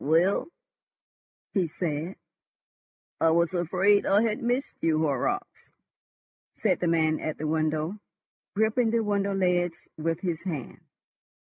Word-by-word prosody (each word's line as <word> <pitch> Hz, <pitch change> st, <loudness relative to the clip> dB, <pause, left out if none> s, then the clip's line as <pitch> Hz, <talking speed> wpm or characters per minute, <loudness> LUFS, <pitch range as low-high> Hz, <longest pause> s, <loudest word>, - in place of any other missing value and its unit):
"Well?" 165 Hz, +7 st, +3 dB, 1.1 s
he 185 Hz, -5 st, +2 dB
said. 160 Hz, +2 st, -3 dB, 1.0 s
"I 165 Hz, -, +4 dB
was 170 Hz, +2 st, +2 dB
afraid 185 Hz, +4 st, +3 dB
I 205 Hz, +3 st, +4 dB
had 220 Hz, -2 st, 0 dB
missed 245 Hz, +3 st, -1 dB
you, 160 Hz, -1 st, +2 dB
Horrocks," 145 Hz, -5 st, -1 dB, 0.9 s
said -, -, +1 dB
the 175 Hz, -, 0 dB
man 160 Hz, -1 st, +2 dB
at 155 Hz, -, -3 dB
the 155 Hz, -, -4 dB
window, 155 Hz, +3 st, 0 dB, 0.6 s
gripping 220 Hz, +3 st, +2 dB
the 230 Hz, 0 st, +1 dB
window 200 Hz, -1 st, 0 dB
ledge 175 Hz, -2 st, +1 dB, 0.2 s
with 165 Hz, +2 st, -1 dB
his 170 Hz, -3 st, -2 dB
hand. 160 Hz, -, -5 dB
175 Hz, 125 wpm, -27 LUFS, 160-200 Hz, 1.1 s, I